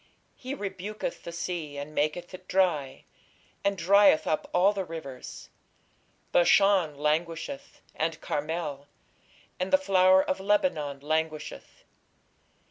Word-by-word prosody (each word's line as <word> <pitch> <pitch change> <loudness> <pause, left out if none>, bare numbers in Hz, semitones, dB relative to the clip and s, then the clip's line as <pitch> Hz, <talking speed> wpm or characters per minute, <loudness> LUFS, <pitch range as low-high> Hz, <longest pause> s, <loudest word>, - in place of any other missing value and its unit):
He 260 +2 -6
rebuketh 200 -3 -5
the 170 - -7
sea, 170 -4 -4
and 145 +2 -6
maketh 155 +5 -1
it 185 0 -11
dry, 165 -8 0 0.6
and 200 0 +1
drieth 195 0 +5
up 155 - -1
all 190 +3 +4
the 195 -2 -2
rivers: 155 -7 -9 0.8
Bashan 180 -3 +4
languisheth, 170 - -2
and 160 0 -2
Carmel, 150 -2 -3 0.7
and 185 +1 -2
the - - +7
flower 190 -7 +4
of 185 - -2
Lebanon 190 - 0
languisheth.... 155 +1 -3
175 Hz, 115 wpm, -28 LUFS, 155-195 Hz, 0.8 s, the